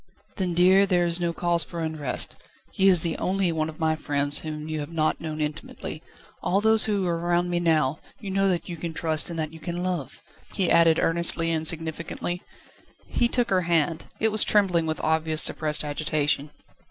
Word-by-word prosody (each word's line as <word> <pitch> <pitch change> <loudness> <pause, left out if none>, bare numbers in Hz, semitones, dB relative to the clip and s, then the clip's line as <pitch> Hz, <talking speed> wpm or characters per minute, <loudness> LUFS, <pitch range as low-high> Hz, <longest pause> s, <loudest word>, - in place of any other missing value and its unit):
"Then, 180 -4 -2
dear, 190 +3 +5
there 175 -2 +2
is 170 +1 +2
no 170 -1 0
cause 170 0 +1
for 170 - -8
unrest. 155 -5 -3 0.4
He 195 - +2
is 180 -4 +6
the 170 - -2
only 190 -1 0
one 160 -1 -2
of 155 - -11
my 160 -1 +1
friends 145 -2 +1
whom 155 -1 -6
you 155 -1 -4
have 145 +2 -6
not 155 -1 -1
known 155 -1 -5
intimately. 150 0 -5 0.4
All 195 - +1
those 220 +1 +5
who 205 -3 -1
are 170 -1 -1
round 175 +1 0
me 175 - 0
now, 155 -4 +1 0.2
you 200 -4 -7
know 195 0 +1
that 175 -2 -2
you 175 -2 -6
can 160 0 -6
trust 155 -1 -1
and 170 - -6
that 155 -1 -4
you 160 - -11
can 175 +2 -5
love," 180 -7 -4 0.3
he 190 -4 0
added 165 -1 +5
earnestly 165 0 0
and 160 -1 -1
significantly. 165 +2 -3 0.6
He 240 - 0
took 240 0 -1
her 185 -1 +3
hand; 170 -2 0
it 220 0 +2
was 215 0 +3
trembling 180 -6 +2
with 155 - -2
obvious 160 0 +4
suppressed 155 -1 +4
agitation. 150 -1 -1
165 Hz, 200 wpm, -25 LUFS, 155-180 Hz, 0.6 s, is